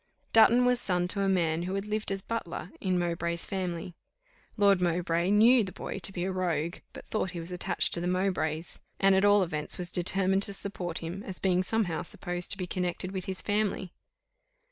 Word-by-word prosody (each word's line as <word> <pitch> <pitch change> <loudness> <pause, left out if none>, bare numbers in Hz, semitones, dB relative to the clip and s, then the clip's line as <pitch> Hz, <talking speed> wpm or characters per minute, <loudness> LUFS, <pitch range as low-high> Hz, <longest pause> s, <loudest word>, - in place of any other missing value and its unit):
Dutton 240 +2 +6
was 250 0 +2
son 180 -2 0
to 200 +1 +3
a 195 - +2
man 170 -3 +1
who 185 +2 -3
had 195 +1 -2
lived 215 -1 -2
as 195 -1 -2
butler 195 -5 -5
in 185 -2 +1
Mowbray's 170 -1 0
family. 180 -3 -4 0.6
Lord 200 -3 +4
Mowbray 170 0 +1
knew 225 +4 +6
the 190 - -5
boy - - -6
to 185 +1 +2
be 175 -2 -4
a 190 - -1
rogue, 170 -3 -1
but - - -11
thought 215 -3 -1
he - - -3
was 165 +2 -7
attached 180 - 0
to 170 - +1
the 175 - -2
Mowbrays, 180 -3 -1 0.2
and 195 0 +5
at 190 +1 +3
all 205 -1 +5
events 155 -4 -1
was 180 -2 -4
determined 190 +2 +1
to 200 0 +1
support 180 -4 -5
him, 175 +4 -5
as 190 -3 -7
being 185 -1 +2
somehow 185 -4 -1
supposed 175 0 -3
to - - +3
be 185 - -3
connected 180 0 -3
with 190 -2 -4
his 190 -1 -3
family. 205 -3 -1
185 Hz, 205 wpm, -29 LUFS, 175-195 Hz, 0.6 s, Dutton